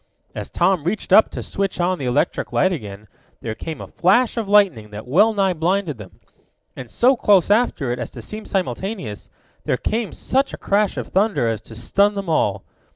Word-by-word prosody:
As - - -6
Tom 190 -5 +1
reached 185 +7 -2
up 220 - +7
to - - -6
switch 195 -2 -3
on 180 +1 0
the 135 - -3
electric 125 - 0
light 185 - +2
again, 105 - -7 0.3
there 115 - -4
came 160 +7 -7
a - - -7
flash 210 +7 +2
of 225 -4 -3
lightning 185 - +3
that 105 +3 -9
well 200 - +4
nigh 195 -3 +1
blinded 170 - -1
them. 100 -3 -12 0.6
And 125 - -9
so 255 +3 +3
close 200 -5 +3
after 205 - +1
it 120 - -3
as - - -4
to - - -6
seem 215 +1 -7
simultaneous, 190 - -4 0.4
there 125 - 0
came 220 - -2
such 270 +2 -1
a - - -13
crash 205 0 0
of - - -5
thunder 195 - +1
as 110 -2 -2
to 110 - -13
stun 200 - +1
them 195 -3 -4
all. 105 -11 +1
185 Hz, 200 wpm, -21 LUFS, 125-205 Hz, 0.6 s, up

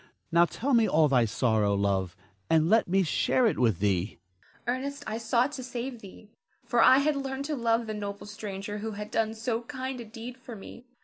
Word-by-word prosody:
Now 170 +1 +6
tell 260 - -2
me 230 -2 +4
all 155 0 +4
thy 125 -4 +3
sorrow, 110 -3 +1
love, 95 -3 0 0.3
and 160 +2 +3
let 225 +1 +4
me 190 +2 +3
share 240 +9 +2
it 220 - +1
with 115 -7 +3
thee. 95 0 0 0.5
Zara. 245 +2 0
Ernest, 280 +1 -5
I 220 +1 -3
sought 235 +4 +1
to 275 -3 -6
save 245 -1 -5
thee; 205 +2 -13 0.3
for 240 -2 +2
I 260 - +7
had 290 +2 +2
learned 270 0 -3
to 300 0 -2
love 230 -2 +1
the 215 - -4
noble 205 -1 -5
stranger 210 -1 -6
who 220 +1 -4
had 210 +1 -7
done 220 0 0
so 225 +1 -2
kind 260 +1 -5
a - - -6
deed 235 +3 -9
for 250 -2 -10
me. 240 +4 -12
220 Hz, 210 wpm, -28 LUFS, 170-250 Hz, 0.5 s, I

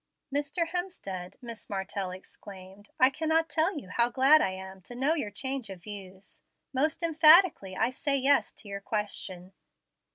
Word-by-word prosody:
"Mr. 295 +4 -1
Hemstead," 200 - -5
Miss 230 -2 -8
Martell 195 -1 -3
exclaimed, 190 +1 -12
"I 255 +1 +6
cannot 320 +3 0
tell 325 +3 +1
you 225 -10 -8
how 235 +4 +2
glad 275 +5 +5
I - - +1
am 190 0 -9
to 245 - -11
know 270 +6 +1
your 290 -10 -2
change 260 +2 -4
of 185 -3 -10
views. 195 -2 -10 0.3
Most 305 +5 0
emphatically 320 - +5
I 230 +3 +1
say 275 +2 0
yes 275 +1 +3
to 215 - -11
your 200 0 -6
question. 195 -3 -5
235 Hz, 160 wpm, -28 LUFS, 195-305 Hz, 0.3 s, I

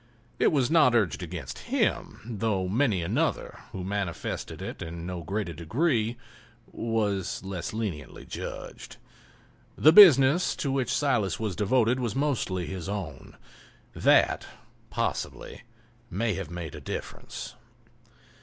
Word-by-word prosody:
It - - +4
was 135 -3 +1
not 155 -7 +5
urged 100 -10 +1
against - - -6
him, - - 0
though 110 -5 -1
many 105 -3 +1
another, - - -1
who 95 - -5
manifested 95 -2 -3
it - - -6
in 85 +1 -6
no 90 -1 -4
greater 95 +1 -3
degree, 115 - 0 0.5
was 105 -7 -2
less 95 -3 -4
leniently 100 -10 -5
judged. - - -7 0.8
The 155 - +7
business 165 -4 +8
to 140 - -2
which 130 -3 0
Silas 120 - +1
was 105 -5 -2
devoted 115 +4 +2
was 120 -4 -2
mostly 125 -11 0
his 95 0 -5
own—that, 100 -5 -1 0.4
possibly, - - -3 0.5
may 110 +3 0
have 95 -5 -5
made 85 -3 -6
a - - -8
difference. - - -6
105 Hz, 120 wpm, -27 LUFS, 90-125 Hz, 0.8 s, business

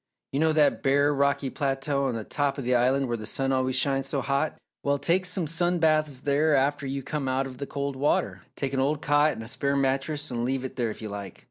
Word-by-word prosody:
You 135 - -1
know 160 0 +3
that 150 -2 +3
bare 140 +2 +3
rocky 140 -1 +1
plateau 140 0 -1
on 115 -5 -2
top 145 -1 -1
of 140 - -4
the 125 +1 +1
Island 130 +3 +2
where 120 -1 -1
the 110 -1 -7
sun 135 0 -1
always 130 -1 +1
shines 135 0 +1
so 140 -1 -1
hot? 140 +4 -1 0.2
Well, 140 0 +1
take 180 +5 +1
some 180 -1 -1
sun 175 +3 0
baths 155 -4 +2
there 145 +2 +2
after 140 +1 +1
you 135 0 -3
come 150 -1 -3
out 130 +1 0
of 130 -1 -9
the 140 - -4
cold 140 -1 -3
water. 100 -9 0
Take 140 -1 -3
an 135 - 0
old 145 +3 0
cot 145 +1 +3
and 110 - -7
a - - -8
spare 140 +4 -1
mattress 140 +2 -1
and 120 -1 -2
leave 130 +1 -1
it 130 - -6
there 120 -2 0
if 110 - -8
you 110 - -4
like. 100 -2 -7
140 Hz, 245 wpm, -26 LUFS, 130-145 Hz, 0.2 s, know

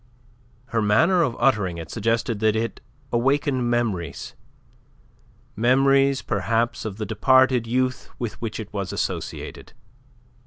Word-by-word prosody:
Her 115 - 0
manner 165 - +3
of 130 -8 0
uttering 105 -9 +2
it 80 -1 -8
suggested 115 0 -1
that 110 0 +2
it 115 +1 -3 0.3
awakened 130 0 +1
memories, 115 -8 -2 1.2
memories 135 +3 +3
perhaps 115 +4 -1
of 105 -2 -5
the 110 - -3
departed 130 +3 +3
youth 130 +1 -1
with 120 -3 -5
which 115 -2 -4
it 105 -1 -8
was 100 -3 -3
associated. - - -5
115 Hz, 120 wpm, -23 LUFS, 105-130 Hz, 1.2 s, manner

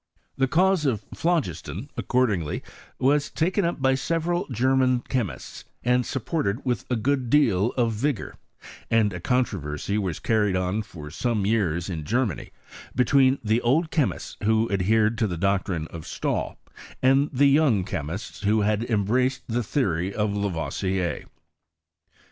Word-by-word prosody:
The 135 0 +2
cause 180 +1 +3
of 115 -7 -1
phlogiston, 160 - -2
accordingly, 105 -12 0 0.3
was 140 +2 +2
taken 180 +4 0
up 170 -2 -1
by 130 0 +3
several 165 +5 -1
German 130 +1 +2
chemists, 120 - -4 0.2
and 125 0 +2
supported 130 -3 -2
with 125 -2 -1
a 125 - +1
good 125 +2 0
deal 115 -6 +3
of 115 -3 +1
vigour; 130 +3 -2 0.5
and 110 -3 +3
a 90 - -5
controversy 100 - -1
was 95 -6 -2
carried 105 -4 +1
on 95 +3 0
for 75 -7 -10
some 110 +2 -1
years 90 -6 0
in 85 -5 -4
Germany 120 - -1 0.5
between 130 +1 +4
the 110 +2 +2
old 155 +7 +2
chemists 150 -5 -1
who 110 +1 +2
adhered 110 +4 +2
to 110 - +2
the 90 -3 -4
doctrine 95 -3 0
of 80 -2 -9
Stalil, - - -2 0.5
and 135 +3 +4
the 140 0 +3
young 135 -9 +3
chemists 85 +1 -5
who 105 +1 +2
had 105 +1 +1
embraced 125 +4 +1
the 120 +1 0
theory 95 - -1
of 105 -1 0
Lavoisier. 95 -1 -2
115 Hz, 140 wpm, -25 LUFS, 100-130 Hz, 0.5 s, between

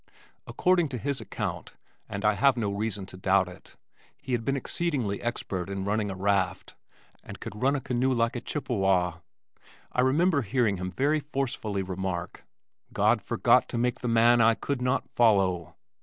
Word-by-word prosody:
According 175 -4 +2
to 130 - -4
his 140 +3 -2
account - - -5 0.3
(and 100 +1 -4
I 105 - +5
have 135 +4 +3
no 105 -4 -1
reason 105 -1 -3
to 95 - -11
doubt 95 0 +2
it) 90 - -14 0.4
he 130 - -8
had 120 -2 0
been 135 +4 0
exceedingly 135 - -2
expert 95 -6 -3
in 95 -1 -3
running 105 0 0
a 95 - -4
raft 95 -1 0 0.5
and - - -10
could 105 - -8
ride 135 +2 +3
a 140 - -2
canoe 125 +1 0
like 115 -1 +1
a 120 - -3
Chippewa. 95 - 0 0.7
I 125 - +1
remember 145 +4 +3
hearing 110 -2 +1
him 90 +1 -4
very 145 +9 +1
forcefully 130 -9 -3
remark, 95 -1 -4 0.5
"God - - +2
forgot - - +3
to - - -3
make 120 +1 0
the 125 - -4
man 115 +1 +5
I 115 0 +5
could 140 +1 -3
not 125 +2 0
follow." 95 -8 +2
115 Hz, 170 wpm, -27 LUFS, 95-130 Hz, 0.7 s, I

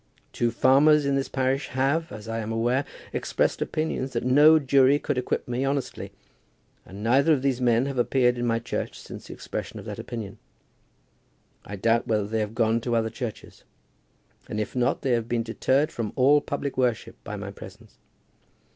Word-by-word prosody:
Two 120 - +1
farmers 140 +5 +4
in 140 - +1
this 135 0 -1
parish 135 +1 0
have, 140 +6 0
as 105 +1 -9
I 115 0 -3
am 110 0 -4
aware, 120 +5 0 0.3
expressed - - 0
opinions 155 -4 -2
that 115 - -1
no 150 +5 +7
jury 140 -1 +4
could 145 -1 -2
acquit 125 - -2
me 125 +2 -2
honestly, 135 -1 -3 0.8
and 100 +2 -9
neither 135 +7 +4
of 135 -3 -1
these 130 -2 0
men 120 0 +3
have 135 -2 -3
appeared 125 0 +2
in 120 - -1
my 115 0 +2
church 115 - -4
since - - -10
the - - -8
expression - - -6
of - - -9
that - - -6
opinion. 110 -4 -7 1.2
I 100 - -7
doubt 115 +4 +1
whether 105 -2 +1
they 110 +2 -2
have 105 +1 -3
gone 115 0 +2
to 120 0 -1
other 110 -1 0
churches; 115 -3 -7 0.9
and 105 - -3
if 105 - -4
not 125 -1 0
they 130 - +1
have 115 -1 0
been 115 -1 0
deterred 130 +6 +1
from 115 -3 -4
all 140 +3 +5
public 140 -2 -4
worship 125 -3 0
by - - -6
my - - -6
presence. - - -13
125 Hz, 185 wpm, -25 LUFS, 115-135 Hz, 1.2 s, no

